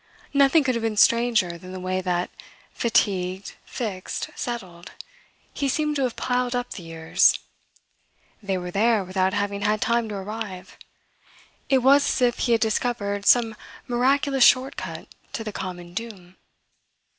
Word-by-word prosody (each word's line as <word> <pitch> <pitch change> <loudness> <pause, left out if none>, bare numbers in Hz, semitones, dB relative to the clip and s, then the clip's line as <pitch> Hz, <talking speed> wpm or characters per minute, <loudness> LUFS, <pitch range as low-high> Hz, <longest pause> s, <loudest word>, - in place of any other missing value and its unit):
Nothing 280 +2 +5
could 260 -1 +1
have 230 - -2
been 225 -2 -2
stranger 225 -8 +3
than 185 +2 -10
the 185 - -6
way 185 +1 -2
that, 180 -1 -1 0.4
fatigued, 190 -4 0
fixed, 205 -7 -5
settled, 185 -8 -6 0.6
he 280 - -1
seemed 300 +2 0
to - - -1
have 250 -3 -1
piled 250 0 -1
up 245 0 -3
the - - -7
years. 165 -1 +2 1.0
They 195 -2 -2
were 180 0 -5
there 215 +2 +2
without 185 0 0
having 200 0 -2
had 210 +1 +1
time 235 0 0
to 210 - -5
arrive. 195 -2 -6 0.9
It 265 -2 +3
was 280 +2 +6
as - - 0
if 245 -1 +2
he 240 - +2
had 225 - +2
discovered 210 -3 -1
some 230 -3 +4 0.3
miraculous 265 +2 +2
short 255 +3 +5
cut - - -7 0.3
to 225 - -4
the 215 -1 -6
common 175 -2 -6
doom. 190 -4 -8
215 Hz, 155 wpm, -24 LUFS, 185-245 Hz, 1.0 s, was